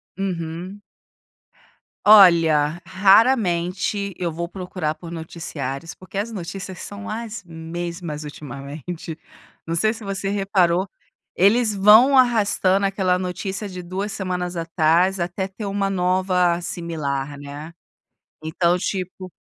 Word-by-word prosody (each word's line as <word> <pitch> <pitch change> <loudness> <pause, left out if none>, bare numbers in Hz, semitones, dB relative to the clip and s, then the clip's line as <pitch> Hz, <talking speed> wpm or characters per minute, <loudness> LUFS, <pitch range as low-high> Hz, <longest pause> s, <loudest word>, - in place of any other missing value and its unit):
Uhum. 180 +1 -4 1.2
Olha, 170 -6 +6
raramente 195 -1 +2
eu 175 -2 -2
vou 170 +2 -4
procurar 180 -4 -4
por 170 0 -10
noticiários, 160 -2 -6
porque 185 +1 -10
as 210 +3 -2
notícias 190 -1 -6
são 205 +1 -7
as 225 -1 -5
mesmas, 170 -1 -6
ultimamente. 150 +3 -7 0.5
Não 165 - -2
sei 215 +6 +2
se 225 - -11
você 195 0 -3
reparou, 195 -2 +1 0.5
eles 215 +3 +3
vão 215 +8 +7
arrastando 205 -5 +3
aquela 190 -2 +1
notícia 190 +3 -4
de 180 -2 -8
2 190 +4 -4
semanas 180 -3 -3
atrás 170 +3 +2
até 180 +2 -2
ter 195 +3 -8
uma 195 0 -1
nova 180 -1 +1
similar, 145 -5 -4
né, 145 +3 -9 0.7
então 170 +2 +1
tipo 185 0 -4
180 Hz, 115 wpm, -22 LUFS, 165-195 Hz, 1.2 s, vão